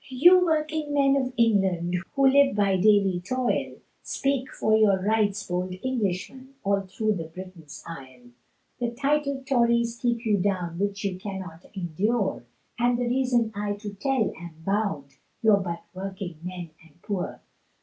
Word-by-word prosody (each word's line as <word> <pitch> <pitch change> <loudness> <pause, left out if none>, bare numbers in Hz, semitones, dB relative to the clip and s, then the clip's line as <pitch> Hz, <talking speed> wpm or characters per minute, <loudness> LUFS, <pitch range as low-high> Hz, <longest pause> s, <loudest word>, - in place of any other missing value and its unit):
You 350 +8 +6
working 310 -2 0
men 275 -1 +4
of 260 -2 0
England, 190 -6 +2 0.2
Who 275 -1 +3
live 275 -2 +5
by 200 -2 +3
daily 195 -1 +4
toil, 255 +4 -1 0.3
Speak 275 -1 -1
for 220 0 +2
your 210 -3 +4
rights, 210 +1 +1
bold 180 +1 -2
Englishmen, 260 +3 -3
All 200 0 +2
thro' 215 +3 -1 0.2
Britain's 170 -4 -10
isle; 130 -6 -11 0.5
The 240 -1 0
titled 280 +1 0
tories 235 -3 +2
keep 235 -1 0
you 210 -2 +3
down, 180 -3 -1
Which 200 0 -1
you 190 -2 -2
cannot 190 -4 -7
endure, 190 - -1 0.4
And 240 0 +3
the 245 - -1
reason 245 -2 +1
I 205 0 -2
to 205 0 -7
tell 240 +2 0
am 165 -2 -11
bound, 180 -10 -1 0.3
You're 215 -2 +6
but 170 -3 -4
working 190 -3 -6
men 180 -2 -6
and 165 0 -22
poor. 200 -4 -4
205 Hz, 150 wpm, -26 LUFS, 185-250 Hz, 0.5 s, You